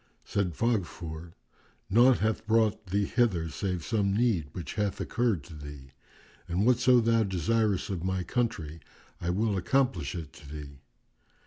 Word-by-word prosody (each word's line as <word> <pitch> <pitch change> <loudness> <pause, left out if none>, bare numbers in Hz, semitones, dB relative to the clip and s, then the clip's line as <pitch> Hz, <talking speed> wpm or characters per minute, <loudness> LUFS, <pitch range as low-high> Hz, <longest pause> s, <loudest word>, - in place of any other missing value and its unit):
Said 90 -5 -1
Faghfur, 85 -7 -2 0.5
"Naught 120 +5 +5
hath 110 +1 -1
brought 110 -2 +2
thee 100 +3 +1
hither 95 -9 +1
save 90 0 -3
some 100 -1 +1
need 110 -10 +2
which 90 - -6
hath 105 -2 -1
occurred 115 - 0
to 85 - -12
thee; 70 -2 -10 0.6
and 90 +4 0
whatso 125 0 +5
thou 115 0 +3
desirest 100 +1 0
of 90 -3 -3
my 95 -1 -1
country 85 - -2 0.4
I 85 - -2
will 105 +3 +1
accomplish 90 - 0
it 80 -4 -7
to 70 - -13
thee." 70 -2 -9
95 Hz, 145 wpm, -29 LUFS, 85-115 Hz, 0.6 s, Naught